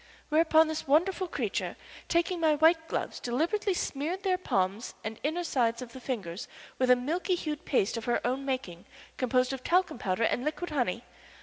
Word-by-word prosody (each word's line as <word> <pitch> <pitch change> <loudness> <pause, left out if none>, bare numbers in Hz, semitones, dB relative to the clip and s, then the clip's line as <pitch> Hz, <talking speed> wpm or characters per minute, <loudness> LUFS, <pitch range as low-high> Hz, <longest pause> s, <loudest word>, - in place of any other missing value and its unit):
Whereupon 320 +1 +5
this 315 -2 -4
wonderful 360 +6 +2
creature, - - -2 0.3
taking 345 +1 +1
my 315 -2 +4
white 320 +2 +4
gloves, - - -3
deliberately 340 - 0
smeared 335 +6 -2
their 375 -2 +2
palms 200 - -1
and 220 +1 -5
inner 320 +5 -1
sides 235 -7 +1
of 245 -2 -8
the 260 - -8
fingers 205 -9 -4 0.3
with 255 -1 +2
a 250 - +8
milk 300 +9 -2
hued 310 -5 -1
paste 235 -4 +1
of 225 - -5
her 240 - +2
own 260 +3 0
making, 255 -11 -4 0.3
composed 255 0 +2
of 260 -1 -6
talcum 360 -7 +2
powder 190 +3 0
and 245 +2 +1
liquid 315 +3 -3
honey. 245 -5 0
275 Hz, 180 wpm, -29 LUFS, 240-335 Hz, 0.3 s, a